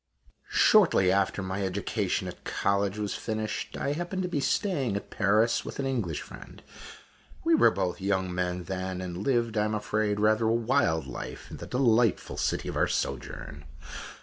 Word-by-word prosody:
Shortly 170 Hz, -, +5 dB
after 95 Hz, 0 st, +1 dB
my 95 Hz, +1 st, -3 dB
education 95 Hz, +1 st, -1 dB
at -, -, -9 dB
college 100 Hz, 0 st, 0 dB
was 105 Hz, -1 st, -2 dB
finished, 110 Hz, -1 st, -3 dB
I 140 Hz, -, -1 dB
happened 175 Hz, +4 st, -3 dB
to -, -, -1 dB
be 170 Hz, -5 st, -1 dB
staying 140 Hz, -, 0 dB
at 100 Hz, -, -5 dB
Paris 110 Hz, +3 st, +2 dB
with -, -, -7 dB
an 140 Hz, -, -2 dB
English 115 Hz, -, -2 dB
friend. -, -, -12 dB, 0.8 s
We 330 Hz, -, +3 dB
were 315 Hz, -, +6 dB
both 90 Hz, +1 st, -2 dB
young 95 Hz, -2 st, 0 dB
men 90 Hz, 0 st, -2 dB
then, 95 Hz, +1 st, -4 dB
and 90 Hz, -1 st, -5 dB
lived, 115 Hz, -1 st, +1 dB
I 105 Hz, -, +2 dB
am 110 Hz, 0 st, -1 dB
afraid, 105 Hz, 0 st, 0 dB
rather 110 Hz, +1 st, +3 dB
a 110 Hz, -, +3 dB
wild 110 Hz, -9 st, +1 dB
life, -, -, -7 dB
in -, -, -7 dB
the -, -, -8 dB
delightful 120 Hz, -4 st, +2 dB
city -, -, -1 dB
of -, -, -4 dB
our -, -, +3 dB
sojourn. 70 Hz, +4 st, -4 dB
105 Hz, 175 wpm, -28 LUFS, 95-120 Hz, 0.8 s, were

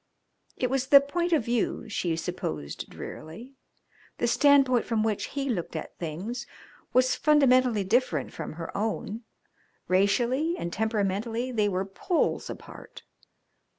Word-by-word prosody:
It 250 Hz, -1 st, -1 dB
was 265 Hz, -1 st, 0 dB
the 280 Hz, 0 st, +9 dB
point 340 Hz, +5 st, -2 dB
of 305 Hz, -9 st, +2 dB
view, 235 Hz, 0 st, -1 dB
she 180 Hz, -5 st, -1 dB
supposed 80 Hz, -, -5 dB
drearily; 225 Hz, -, -9 dB, 0.6 s
the -, -, 0 dB
standpoint 265 Hz, 0 st, +4 dB
from 220 Hz, -2 st, 0 dB
which 220 Hz, -2 st, 0 dB
he 275 Hz, -1 st, -4 dB
looked 180 Hz, -10 st, -3 dB
at 160 Hz, -, -6 dB
things 190 Hz, -, -5 dB, 0.4 s
was 255 Hz, 0 st, +3 dB
fundamentally 255 Hz, -7 st, +4 dB
different 190 Hz, -, 0 dB
from -, -, -6 dB
her 165 Hz, +1 st, -7 dB
own 220 Hz, +1 st, -2 dB, 0.7 s
racially 240 Hz, -, +2 dB
and 170 Hz, -, -4 dB
temperamentally 220 Hz, +3 st, -1 dB
they 210 Hz, -4 st, +1 dB
were 190 Hz, 0 st, -1 dB
poles 345 Hz, -, -1 dB
apart. -, -, -10 dB
230 Hz, 130 wpm, -27 LUFS, 195-260 Hz, 0.7 s, the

